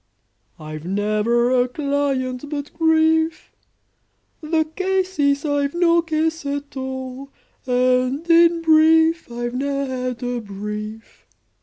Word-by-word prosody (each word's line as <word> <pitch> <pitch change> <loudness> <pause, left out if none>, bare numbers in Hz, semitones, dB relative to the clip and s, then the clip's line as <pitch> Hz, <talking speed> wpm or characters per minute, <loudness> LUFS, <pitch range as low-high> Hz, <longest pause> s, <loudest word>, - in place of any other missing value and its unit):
I've 155 0 -8
never 215 +6 +1
a 250 -1 +3
client 275 -1 -2
but 290 -1 -5
grief: 320 0 +1 0.9
The 315 0 +1
case 375 +2 -2
is, 280 +1 +2
I've 285 0 0
no 340 -1 +3
case 320 0 -1
at 285 0 -5
all, 260 0 -6 0.4
And 255 +4 +1
in 335 0 +5
brief, 320 -1 +4
I've 240 0 -4
ne'er 275 +2 -2
had 255 -2 -4
a 245 0 -2
brief! 210 +2 -8
280 Hz, 115 wpm, -21 LUFS, 250-320 Hz, 0.9 s, in